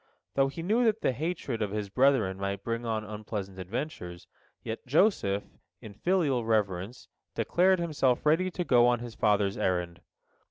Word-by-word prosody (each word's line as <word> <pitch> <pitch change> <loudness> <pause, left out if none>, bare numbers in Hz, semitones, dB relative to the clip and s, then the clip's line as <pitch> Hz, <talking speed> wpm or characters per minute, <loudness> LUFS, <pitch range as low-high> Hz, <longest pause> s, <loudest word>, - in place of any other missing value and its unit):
Though 135 0 +3
he 140 +4 -6
knew 220 +7 +2
that 220 0 +2
the - - +2
hatred 140 -4 -3
of 105 - 0
his 105 0 -3
brethren 125 -7 +2
might 100 0 -3
bring 115 0 -3
on 110 -1 -1
unpleasant 105 -2 -6
adventures, 95 - -5 0.4
yet 115 +3 -6
Joseph, 125 - +2 0.4
in 105 - -10
filial 145 - +1
reverence, 105 0 -1 0.3
declared 185 +2 +3
himself 150 -8 0
ready 165 +5 +3
to 180 0 -3
go 120 -6 +5
on 120 0 +3
his 120 -1 -8
father's 105 -2 +1
errand. 90 -2 -1
115 Hz, 160 wpm, -29 LUFS, 100-150 Hz, 0.4 s, go